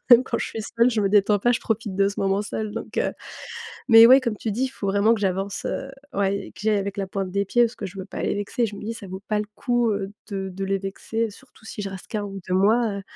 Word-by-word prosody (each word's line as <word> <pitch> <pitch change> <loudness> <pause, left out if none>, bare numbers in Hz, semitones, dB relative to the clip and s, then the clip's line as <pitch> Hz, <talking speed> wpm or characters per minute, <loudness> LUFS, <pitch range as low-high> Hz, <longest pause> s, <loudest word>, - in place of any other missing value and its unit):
même 245 -1 +9
quand 235 -2 -2
je - - -2
suis 225 - -5
seule, 230 +2 +2
je 230 -3 0
me 200 - +2
détends 205 0 +4
pas, 240 - +3
je 240 - +2
profite 220 -3 -2
de 195 0 +4
ce 200 - -5
moment 195 +1 +1
seule. 215 +1 -4
Donc - - -7
heu, - - +1 0.7
mais 225 -2 +9
ouais, 260 +2 +8
comme 235 -5 -2
tu 220 - -3
dis, 235 +6 0
il - - -1
faut 200 -6 -4
vraiment 200 +3 +4
que 220 - -5
j'avance, 195 0 -1
heu, 270 - -3 0.3
ouais, 200 0 0
que - - -12
j'y 220 - +2
aille 210 - +3
avec 200 +1 -3
la 195 -1 -2
pointe 190 0 -3
des 200 +2 0
pieds 240 +5 +3
parce 235 0 +1
que 200 - -5
je 190 - -10
veux 190 -1 -6
pas - - -6
les - - 0
vexer. 205 +4 -1
Je 210 - -7
me - - -9
dis 220 +2 -3
ça 215 -3 -9
vaut 190 +1 -7
pas 215 - +1
le 210 - -2
coup, 240 -1 +1
heu, 200 0 -3 0.2
de 195 -2 -3
de 190 +1 -5
les 195 0 0
vexer, 220 +3 -3
surtout 235 +1 -18
si 220 - -7
je 200 -1 -4
reste 190 -1 -9
que 215 - -2
1 205 - -3
ou 195 -1 -6
2 185 - +1
mois, 220 +5 +4
heu. - - -7
205 Hz, 305 wpm, -24 LUFS, 195-225 Hz, 0.7 s, même